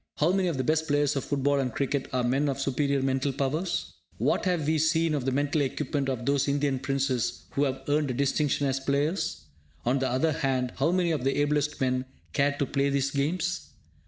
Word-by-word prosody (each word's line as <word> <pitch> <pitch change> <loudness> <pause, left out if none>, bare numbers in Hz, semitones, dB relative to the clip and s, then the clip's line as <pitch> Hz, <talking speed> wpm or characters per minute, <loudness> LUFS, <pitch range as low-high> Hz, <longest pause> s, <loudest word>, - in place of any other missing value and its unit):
How 155 +4 +3
many 190 -1 +1
of 165 -5 -1
the 130 - 0
best 160 +3 +1
players 145 -1 +2
of 135 - -1
football 140 0 +1
and 130 -2 -1
cricket 140 +1 -1
are 125 -1 0
men 135 +4 +1
of 135 0 -2
superior 140 0 0
mental 135 +1 +1
powers? 150 +7 -2 0.2
What - - +1
have 175 -5 +1
we 155 +1 +2
seen 160 +1 +2
of 140 -4 -1
the 135 - +1
mental 145 +3 +1
equipment 140 0 -1
of 125 -3 -3
those 140 0 +2
Indian 140 -1 +1
Princes 135 -3 -1
who 145 - +1
have 135 -1 -3
earned 145 0 +1
a - - 0
distinction 140 +1 +1
as 135 -1 0
players? 145 +7 -1 0.4
On 130 +3 +2
the 130 - 0
other 130 +6 +1
hand, 135 -5 0
how 145 +5 +2
many 180 -2 +2
of 150 -5 -1
the 135 +2 +1
ablest 150 0 +1
men 130 -1 0 0.3
care 145 +1 +2
to 140 - +1
play 140 +1 0
these 140 -1 0
games? 140 - -1
140 Hz, 215 wpm, -27 LUFS, 135-150 Hz, 0.4 s, How